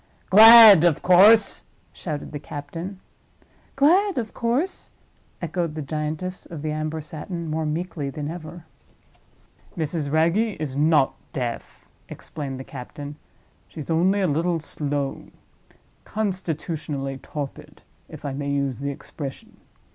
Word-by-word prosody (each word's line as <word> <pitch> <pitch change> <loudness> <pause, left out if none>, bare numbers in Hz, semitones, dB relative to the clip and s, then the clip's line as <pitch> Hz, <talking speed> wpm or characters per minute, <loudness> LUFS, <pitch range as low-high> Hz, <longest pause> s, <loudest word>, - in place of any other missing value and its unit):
"Glad, 220 -3 +10
of 170 -4 +2
course!" 200 +4 +5 0.3
shouted 150 -4 -6
the 145 - -5
captain. 165 +7 -7 0.8
"Glad, 360 +7 +3
of 225 -3 -3
course," 270 +11 -2 0.5
echoed 170 -1 -2
the 155 - -4
giantess 155 +5 -4
of 160 -4 -8
the 155 - -2
amber 155 +1 -3
satin, 165 +3 -7
more 155 0 -2
meekly 155 -2 -3
than 145 +1 -5
ever. 165 0 -8 1.1
"Mrs. 155 -2 -2
Wragge 170 +6 +1
is 145 -4 -4
not 150 -1 +3 0.2
deaf," 120 -6 -5 0.2
explained 135 -4 -7
the - - -6
captain. 140 +3 -9 0.5
"She's 155 0 -7
only 185 +5 +2
a 190 - +2
little 165 +3 0
slow. 145 -3 -3 0.8
Constitutionally 160 -8 -3
torpid—if 145 +1 -10
I 140 - -3
may 140 +1 -4
use 140 -3 -1
the 140 +1 -3
expression. 140 0 -8
155 Hz, 120 wpm, -23 LUFS, 145-185 Hz, 1.1 s, Glad